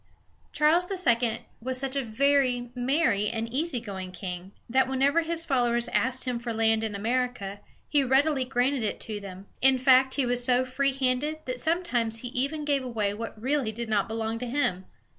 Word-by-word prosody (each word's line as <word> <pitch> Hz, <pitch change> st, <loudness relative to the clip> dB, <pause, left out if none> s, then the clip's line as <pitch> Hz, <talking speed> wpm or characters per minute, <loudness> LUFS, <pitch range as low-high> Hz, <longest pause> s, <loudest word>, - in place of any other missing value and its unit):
Charles 325 Hz, +4 st, +3 dB
II. 240 Hz, -, +1 dB, 0.2 s
was 255 Hz, +2 st, -2 dB
such 270 Hz, +1 st, -2 dB
a 275 Hz, -, 0 dB
very 250 Hz, 0 st, +1 dB
merry 245 Hz, -5 st, +1 dB
and 225 Hz, 0 st, -3 dB
easy 300 Hz, -1 st, 0 dB
going 190 Hz, -5 st, -7 dB
king 180 Hz, +1 st, -6 dB, 0.2 s
that 260 Hz, +2 st, +2 dB
whenever 275 Hz, +5 st, +2 dB
his 330 Hz, 0 st, -2 dB
followers 240 Hz, -4 st, +1 dB
asked 260 Hz, +1 st, 0 dB
him 250 Hz, -2 st, -2 dB
for 235 Hz, 0 st, -4 dB
land 225 Hz, 0 st, +2 dB
in 215 Hz, -2 st, -2 dB
America, 225 Hz, -2 st, -2 dB, 0.3 s
he 290 Hz, -2 st, +2 dB
readily 270 Hz, +1 st, +3 dB
granted 255 Hz, +1 st, 0 dB
it 215 Hz, -, -1 dB
to 215 Hz, -2 st, -4 dB
them. 195 Hz, -1 st, -9 dB, 0.2 s
In 265 Hz, 0 st, +6 dB
fact, 260 Hz, 0 st, +4 dB
he 275 Hz, -, +1 dB
was 245 Hz, 0 st, 0 dB
so 250 Hz, +1 st, +2 dB
free 275 Hz, +2 st, 0 dB
handed 270 Hz, +4 st, -1 dB
that 255 Hz, -1 st, -3 dB
sometimes 245 Hz, -9 st, 0 dB
he 245 Hz, -, -5 dB
even 280 Hz, +4 st, -2 dB
gave 285 Hz, -2 st, +1 dB
away 220 Hz, -5 st, -1 dB
what 225 Hz, 0 st, -7 dB
really 260 Hz, -1 st, 0 dB
did 230 Hz, +1 st, -5 dB
not 205 Hz, -2 st, +1 dB
belong 225 Hz, 0 st, -3 dB
to 250 Hz, -, -4 dB
him! 210 Hz, -8 st, -1 dB
250 Hz, 185 wpm, -27 LUFS, 225-275 Hz, 0.3 s, In